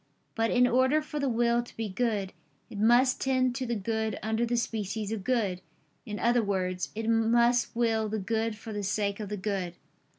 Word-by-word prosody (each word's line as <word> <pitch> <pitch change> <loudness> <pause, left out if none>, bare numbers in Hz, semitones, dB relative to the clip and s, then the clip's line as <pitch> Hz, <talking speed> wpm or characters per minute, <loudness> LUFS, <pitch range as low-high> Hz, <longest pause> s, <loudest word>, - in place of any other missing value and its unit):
But 225 0 +1
in 250 0 +4
order 260 +4 +3
for 300 -1 -5
the 280 -2 0
will 235 0 +2
to 240 - -14
be 225 -1 -2
good, 205 -2 -1 0.4
it 205 - -6
must 240 +4 +4
tend 255 -2 +2
to 255 0 -3
the 235 - -1
good 220 0 -2
under 220 +2 0
the 240 +1 0
species 215 -2 -2
of 220 -3 -3
good; 205 -7 0 0.5
in 210 -1 -4
other 240 +2 +3
words, 185 -3 -1
it 225 0 -3
must 235 +2 +3
will 225 -2 +1
the 220 - -2
good 220 +2 -1
for 220 0 -8
the 205 - -3
sake 200 +1 -1
of 210 -2 -5
the 210 - -3
good. 190 -3 -3
225 Hz, 200 wpm, -29 LUFS, 205-240 Hz, 0.5 s, in